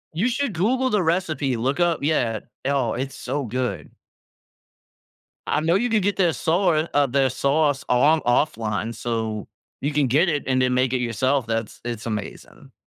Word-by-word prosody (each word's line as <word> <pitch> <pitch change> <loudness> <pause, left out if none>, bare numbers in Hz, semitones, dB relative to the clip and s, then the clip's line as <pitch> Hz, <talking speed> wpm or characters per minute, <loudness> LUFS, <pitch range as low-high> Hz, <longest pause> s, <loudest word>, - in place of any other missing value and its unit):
You 195 +9 +1
should 260 -1 -1
Google 250 +9 +1
the 210 - +2
recipe, 160 -7 0
look 135 +7 -1
up 175 -2 +2
Yeah. 120 -8 0 0.2
Oh, 135 -4 +1
it's 135 +2 -4
so 140 +2 -3
good. 125 +2 -3 1.5
I - - +1
know 165 +3 +2
you 240 +5 +1
can 220 -2 +2
get 200 +1 0
their 175 -4 +2
saur 165 -1 +1
uh, 145 -1 +3
their 135 +1 +2
sauce 140 +2 +1
on 150 +6 +4
offline, 115 -4 0
so 110 -2 -3 0.3
you 145 - -1
can 145 -2 +2
get 150 +9 +3
it 150 -3 -1
and 130 -1 +2
then 125 0 +2
make 130 0 +1
it - - +2
yourself, 125 +3 0
that's 115 -1 -3
It's 120 -1 -5
amazing. 105 -3 -7
140 Hz, 175 wpm, -23 LUFS, 120-165 Hz, 1.5 s, on